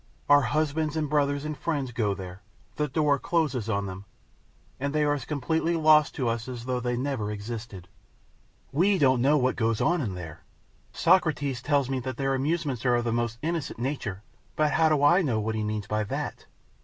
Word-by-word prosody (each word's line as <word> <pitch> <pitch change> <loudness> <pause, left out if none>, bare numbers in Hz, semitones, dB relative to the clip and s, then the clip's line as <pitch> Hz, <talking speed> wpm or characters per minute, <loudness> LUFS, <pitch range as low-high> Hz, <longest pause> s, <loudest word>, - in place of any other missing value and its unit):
Our 145 0 +7
husbands 155 +3 0
and 155 -1 0
brothers 145 0 0
and 155 0 -3
friends 145 -5 -2
go 105 -4 0
there; 95 0 -9 0.3
the 150 - 0
door 145 0 +1
closes 135 -11 0
on 100 -2 0
them, 95 +1 -7 0.7
and 140 +2 -2
they 150 - +3
are 145 0 +2
as 140 -5 -4
completely 160 +4 0
lost 155 -2 +4
to 130 - -1
us 115 0 -2
as 120 -2 -6
though 125 -1 -1
they 125 0 -2
never 130 -5 -2
existed. 105 -3 -6 0.8
We 190 +8 +3
don't 130 -6 +3
know 145 +4 +4
what 130 -2 +1
goes 115 -1 0
on 175 +1 +2
in 100 -8 -3
there. 80 -4 -9 0.5
Socrates 145 -8 +2
tells 140 -2 +1
me 135 -1 -1
that 130 0 -5
their 135 -1 0
amusements 140 -2 -1
are 125 -2 +3
of 120 0 0
a 115 - 0
most 115 0 -1
innocent 165 -2 -2
nature, 115 -6 -4 0.3
but 155 -1 +2
how 160 +1 +3
do 150 -2 +2
I 170 +6 +6
know 125 -10 0
what 110 +1 -2
he 110 -1 -2
means 105 -1 -3
by 105 +1 -1
that? - - -5
135 Hz, 200 wpm, -27 LUFS, 115-150 Hz, 0.8 s, Our